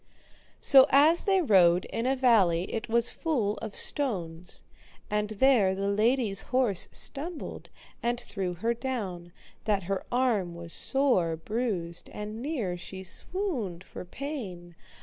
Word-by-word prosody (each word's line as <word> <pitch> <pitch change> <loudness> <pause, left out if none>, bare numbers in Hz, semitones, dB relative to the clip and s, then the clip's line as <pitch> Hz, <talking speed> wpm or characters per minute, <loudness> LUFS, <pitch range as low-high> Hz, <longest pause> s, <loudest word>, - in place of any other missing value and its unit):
So 270 -1 +8
as 305 +5 +5
they 385 -2 +3
rode 180 - +5
in 230 +2 -3
a 265 - +2
valley 195 -10 +3
it 225 +1 -4
was 235 +1 +2
full 230 -11 -1
of 215 -2 -7
stones, 180 - -2 0.5
and 210 0 0
there 215 -4 +3
the 200 +1 -1
lady's 215 -1 +1
horse 240 -7 +2
stumbled 310 +3 -4 0.3
and 240 0 -1
threw 185 -6 -4
her 225 +7 0
down, 205 -9 -5 0.3
that 205 -3 +1
her 195 +2 -2
arm 230 -9 +1
was 170 -1 -9
sore 245 -12 +1
bruised 180 -2 -3
and 210 +2 -6
near 240 - -2
she 190 +2 -8
swooned 230 - -3
for - - -9
pain. 185 - -7
215 Hz, 135 wpm, -28 LUFS, 180-260 Hz, 0.5 s, So